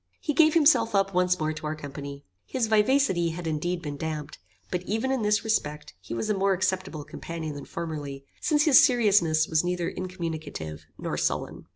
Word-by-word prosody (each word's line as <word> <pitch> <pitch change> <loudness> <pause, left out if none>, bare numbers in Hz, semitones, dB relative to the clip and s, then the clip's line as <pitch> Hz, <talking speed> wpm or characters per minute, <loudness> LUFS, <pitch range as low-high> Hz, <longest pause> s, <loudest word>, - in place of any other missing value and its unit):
He 300 - -2
gave 315 +1 +5
himself 255 -9 +4
up 195 0 +2
once 180 0 +2
more 155 0 0
to 155 0 -6
our 155 - -2
company. 140 -1 -8 0.2
His 255 -3 0
vivacity 215 -5 +3
had 170 +1 -6
indeed 170 +3 -2
been 145 -2 -5
damped; 155 -1 -5 0.3
but 180 - -1
even 225 +5 0
in 265 -3 0
this 210 0 +2
respect 150 -9 -2
he 95 - -6
was 115 - -2
a 215 - +2
more 195 0 +2
acceptable 185 -4 -1
companion 160 0 -6
than 145 - -8
formerly, 145 -5 -6 0.2
since 295 -2 +3
his 295 -4 +7
seriousness 195 -10 +4
was 160 0 +2
neither 175 -1 -1
incommunicative 160 - -5
nor - - -3
sullen. - - -2
175 Hz, 185 wpm, -27 LUFS, 155-210 Hz, 0.3 s, his